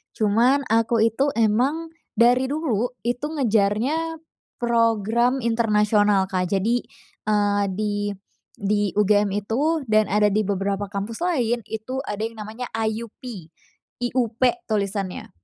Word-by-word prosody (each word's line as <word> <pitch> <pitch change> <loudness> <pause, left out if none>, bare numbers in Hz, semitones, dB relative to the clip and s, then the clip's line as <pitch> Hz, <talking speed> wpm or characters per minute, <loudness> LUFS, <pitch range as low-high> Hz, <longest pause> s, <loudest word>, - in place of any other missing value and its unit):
Cuman 235 +6 +3
aku 230 0 +3
itu 230 +5 +2
emang 255 +9 +1 0.2
dari 245 +3 +4
dulu 265 -6 0 0.2
itu 245 +4 -1
ngejarnya 265 +4 0 0.4
program 235 +1 +1
internasional, 210 -3 +3
Kak. 180 -1 0
Jadi, 210 +6 0 0.4
eee, 205 -1 +2
di 210 0 -1 0.6
di 205 0 0
UGM 210 0 +3
itu 290 +8 0
dan 215 -2 +3
ada 210 +1 +3
di 215 - +3
beberapa 200 0 -1
kampus 200 +3 -4
lain, 245 -10 +1
itu 225 +4 -4
ada 210 +1 -3
yang 225 0 -5
namanya 220 +4 -6
IUP, 220 0 -3 0.8
I-U-P 245 -2 -1 0.3
tulisannya. 200 -2 -2
225 Hz, 115 wpm, -23 LUFS, 205-245 Hz, 0.8 s, dari